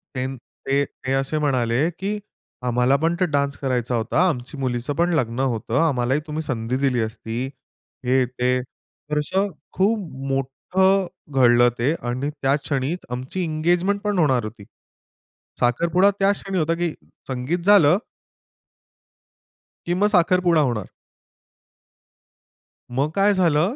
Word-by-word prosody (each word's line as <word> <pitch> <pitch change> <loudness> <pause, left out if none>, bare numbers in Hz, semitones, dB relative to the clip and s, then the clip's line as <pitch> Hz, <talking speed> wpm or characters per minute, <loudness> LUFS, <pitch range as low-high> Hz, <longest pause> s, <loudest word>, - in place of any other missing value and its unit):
ते 130 0 -1 0.4
ते 140 +1 +2
ते 130 - -7
असे 135 +3 0
म्हणाले 130 +1 +1
की 205 +2 -2 0.5
आम्हाला 125 +2 +3
पण 165 +1 +2
ते 185 - +3
डान्स 140 -1 0
करायचा 125 -3 -1
होता. 135 +10 +2
आमची 130 -1 -5
मुलीचं 125 0 -2
पण 170 +2 +1
लग्न 120 -4 -1
होतं. 120 -1 0
आम्हालाही 130 -1 +1
तुम्ही 155 +1 -3
संधी 125 -3 -2
दिली 135 -2 +1
असती. 115 +2 -4 0.6
हे 130 +1 +3
ते. 125 +1 0 0.5
तर 150 - +1
असं 190 +7 0 0.3
खूप 210 +4 +2 0.3
मोठं 185 +9 +1 0.3
घडलं 120 -2 +5
ते 130 +6 +2
आणि 130 +4 -2
त्या 135 +1 +3
क्षणीच 145 +3 -2
आमची 130 +9 -4
एंगेजमेंट 175 +5 +1
पण 205 -3 0
होणार 130 -7 +3
होती. 110 0 -8 1.0
साखरपुडा 170 +10 +3
त्या 195 +1 +4
क्षणी 195 -1 -3
होता 165 0 +1
की 170 -1 -1 0.4
संगीत 130 +6 -2
झालं 185 -5 +6 1.9
की 175 - 0
मग 205 +3 +3
साखरपुडा 175 -2 +3
होणार. 105 -5 -4 2.1
मग 140 +3 +2
काय 200 +1 +4
झालं 175 - +2
140 Hz, 130 wpm, -22 LUFS, 125-175 Hz, 2.1 s, झालं